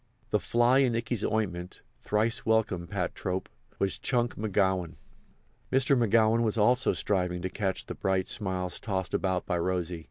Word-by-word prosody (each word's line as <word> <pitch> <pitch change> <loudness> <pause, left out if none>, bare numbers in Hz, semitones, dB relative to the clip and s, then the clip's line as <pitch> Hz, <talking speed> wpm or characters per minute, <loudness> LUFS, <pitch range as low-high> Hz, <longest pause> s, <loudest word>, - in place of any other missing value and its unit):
The - - +3
fly 120 +3 +3
in 125 -4 +3
Ikey's 115 -1 -2
ointment 95 -5 -2 0.2
(thrice 110 +2 0
welcome, 110 -6 +1
pat 95 -2 -2
trope!) 95 0 -3 0.3
was 95 -1 -1
Chunk 120 -2 0
McGowan. 95 -5 0 0.8
Mr. 135 +1 +3
McGowan 115 -1 +3
was 110 -1 0
also 125 +5 +3
striving 90 -3 -1
to 95 - -1
catch 95 -3 -2
the - - -5
bright 95 -1 0
smiles 95 -3 -2
tossed 95 -4 -3
about 95 -2 0
by 90 - -1
Rosy. 90 -1 -1
100 Hz, 155 wpm, -29 LUFS, 90-115 Hz, 0.8 s, The